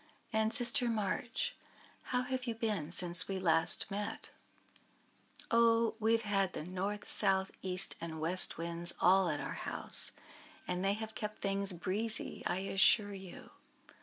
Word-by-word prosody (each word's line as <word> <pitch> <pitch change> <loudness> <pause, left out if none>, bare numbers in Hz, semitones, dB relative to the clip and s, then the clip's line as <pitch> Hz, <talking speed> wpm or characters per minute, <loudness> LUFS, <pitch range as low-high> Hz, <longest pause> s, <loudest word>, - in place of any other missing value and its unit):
"And, 220 0 0
Sister 245 +2 +2
March, 225 +2 -3 0.5
how 250 0 -2
have 255 0 -5
you 230 - -3
been 210 -9 -3
since 175 0 +6
we 195 - -4
last 165 +1 +2
met?" 205 +1 -6 1.2
"Oh! 230 0 +2
we 220 +1 +1
have 230 0 0
had 195 -3 -1
the - - -6
North, 190 +4 -5
South, 190 -2 +3
East, 185 -1 +1
and 160 -1 -7
West 175 +4 +4
Winds 170 +1 0
all 185 0 +3
at 150 -2 -3
our - - -6
house, - - -1 0.5
and 180 +1 -3
they 195 +1 +1
have 220 +1 -7
kept 210 0 -7
things 195 0 0
breezy, 200 +6 0
I 185 - -3
assure 205 +1 +2
you. 190 -2 -12
195 Hz, 150 wpm, -32 LUFS, 180-220 Hz, 1.2 s, since